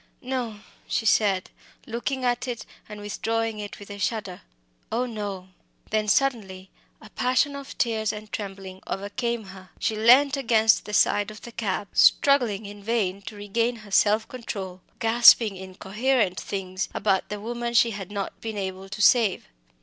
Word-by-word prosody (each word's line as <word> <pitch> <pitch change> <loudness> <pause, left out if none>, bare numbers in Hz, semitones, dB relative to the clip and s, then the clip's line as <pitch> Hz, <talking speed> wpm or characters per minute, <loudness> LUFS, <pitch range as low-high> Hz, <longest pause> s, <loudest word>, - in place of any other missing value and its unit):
"No!" 245 -5 -3 0.3
she 225 - -1
said, 200 -3 +2 0.3
looking 255 +3 -3
at 245 +1 0
it 240 -3 -5 0.2
and 210 0 -8
withdrawing 225 +1 -2
it 205 -1 -7
with 205 0 -11
a 200 - -8
shudder; 195 -3 -3 0.5
"oh 240 +3 0
no!" 205 -5 -5 0.4
Then 215 0 +1
suddenly 200 -7 0 0.3
a 215 - -15
passion 255 +3 +1
of 280 -1 -9
tears 220 -3 0
and 210 0 -9
trembling 195 -2 -6
overcame 220 +4 -3
her. 190 -1 -12
She 220 - -1
leant 255 +6 +6
against 225 -5 +3
the 210 - -7
side 205 0 +3
of 215 0 -11
the 235 - -9
cab, 205 -3 -2
struggling 240 -8 +4
in 205 0 -9
vain 200 -3 -1
to 215 - -6
regain 230 +4 -1
her 205 - -14
self 210 +2 +3
control, 195 -7 -6 0.2
gasping 225 -2 +6
incoherent 190 +3 -1
things 190 -1 -4
about 195 -2 +1
the 210 - -4
woman 235 +2 -4
she 230 0 +5
had 195 -3 -6
not 200 -1 -5
been 220 -2 -5
able 190 0 -5
to 195 +2 -5
save. 225 -7 +4
215 Hz, 160 wpm, -25 LUFS, 195-235 Hz, 0.5 s, leant